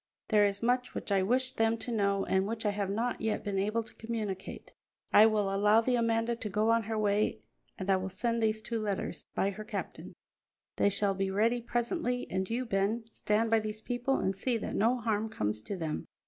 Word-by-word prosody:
There 210 Hz, -2 st, +5 dB
is 200 Hz, +2 st, -4 dB
much 250 Hz, +1 st, +1 dB
which -, -, -4 dB
I 195 Hz, -1 st, +4 dB
wish 255 Hz, +6 st, +2 dB
them 225 Hz, -2 st, +1 dB
to 240 Hz, -, -6 dB
know 200 Hz, -3 st, +1 dB
and 190 Hz, +1 st, +1 dB
which 225 Hz, 0 st, -4 dB
I 210 Hz, -, +3 dB
have 200 Hz, -1 st, -2 dB
not 230 Hz, +5 st, -1 dB
yet 220 Hz, -1 st, -1 dB
been 200 Hz, -2 st, -1 dB
able 215 Hz, +4 st, 0 dB
to -, -, -15 dB
communicate. 220 Hz, -4 st, -5 dB, 0.4 s
I 215 Hz, +1 st, +9 dB
will 210 Hz, -3 st, +1 dB
allow 210 Hz, +2 st, +5 dB
the 245 Hz, +2 st, +1 dB
Amanda 230 Hz, 0 st, +1 dB
to 225 Hz, -2 st, -5 dB
go 215 Hz, +3 st, +2 dB
on 230 Hz, 0 st, +3 dB
her 220 Hz, 0 st, -2 dB
way 205 Hz, -, +1 dB, 0.3 s
and 190 Hz, -, -5 dB
I 195 Hz, -1 st, +4 dB
will 185 Hz, +1 st, -3 dB
send 230 Hz, +5 st, -1 dB
these 220 Hz, 0 st, +1 dB
two 230 Hz, -1 st, -2 dB
letters 205 Hz, -3 st, -3 dB
by 195 Hz, -, +1 dB
her 215 Hz, +2 st, -7 dB
captain. 215 Hz, -, -6 dB, 0.6 s
They -, -, +4 dB
shall 200 Hz, 0 st, +2 dB
be 195 Hz, 0 st, -1 dB
ready 225 Hz, +5 st, +2 dB
presently, 245 Hz, +2 st, -1 dB
and 190 Hz, 0 st, -1 dB
you, 245 Hz, +3 st, -1 dB
Ben, 210 Hz, +2 st, 0 dB
stand 220 Hz, +2 st, 0 dB
by 225 Hz, -, +5 dB
these 215 Hz, 0 st, -5 dB
people 245 Hz, +2 st, 0 dB
and 190 Hz, 0 st, 0 dB
see 235 Hz, +5 st, 0 dB
that -, -, -5 dB
no 235 Hz, +5 st, +3 dB
harm 220 Hz, -2 st, -1 dB
comes 105 Hz, -, -2 dB
to 200 Hz, -, -5 dB
them." 160 Hz, -3 st, -3 dB
215 Hz, 215 wpm, -31 LUFS, 200-230 Hz, 0.6 s, I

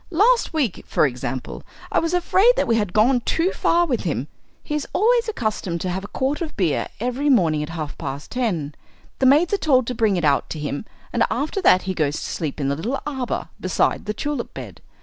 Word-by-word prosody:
Last 440 Hz, +8 st, +3 dB
week, 285 Hz, -, -1 dB
for -, -, +3 dB
example, 125 Hz, -1 st, -4 dB, 0.3 s
I -, -, +3 dB
was 330 Hz, +2 st, 0 dB
afraid 375 Hz, +5 st, +4 dB
that -, -, +1 dB
we 230 Hz, -, +2 dB
had 205 Hz, -5 st, 0 dB
gone 240 Hz, +6 st, +4 dB
too 335 Hz, +9 st, +1 dB
far 345 Hz, +1 st, +2 dB
with 255 Hz, -8 st, -1 dB
him. 145 Hz, -, -2 dB, 0.3 s
He -, -, -5 dB
is 300 Hz, -2 st, -2 dB
always 470 Hz, +2 st, +3 dB
accustomed 215 Hz, -, -2 dB
to 185 Hz, -, -2 dB
have 190 Hz, +2 st, -3 dB
a -, -, -6 dB
quart 275 Hz, +7 st, -2 dB
of 315 Hz, -3 st, -5 dB
beer 170 Hz, -8 st, +1 dB
every 250 Hz, +5 st, -1 dB
morning 165 Hz, -, +3 dB
at 150 Hz, -, -4 dB
half 160 Hz, -3 st, -5 dB
past 140 Hz, +2 st, -6 dB
ten 175 Hz, -, -1 dB, 0.5 s
the 265 Hz, -, +4 dB
maids 310 Hz, +8 st, +4 dB
are -, -, +4 dB
told 260 Hz, -8 st, +3 dB
to 250 Hz, -, -3 dB
bring 220 Hz, -5 st, +2 dB
it 170 Hz, -, 0 dB
out 140 Hz, -2 st, +2 dB
to 155 Hz, -, -5 dB
him, 145 Hz, +4 st, -4 dB, 0.3 s
and 235 Hz, -, 0 dB
after 305 Hz, +9 st, -2 dB
that 185 Hz, -, +5 dB
he 190 Hz, -, -2 dB
goes 155 Hz, -4 st, 0 dB
to -, -, -4 dB
sleep 155 Hz, -2 st, -4 dB
in 140 Hz, -, 0 dB
the 140 Hz, -, 0 dB
little 235 Hz, -, -2 dB
arbour 265 Hz, -4 st, -3 dB
beside -, -, 0 dB
the 210 Hz, -, -1 dB
tulip 290 Hz, +5 st, -3 dB
bed. -, -, -9 dB
235 Hz, 225 wpm, -22 LUFS, -, 0.5 s, that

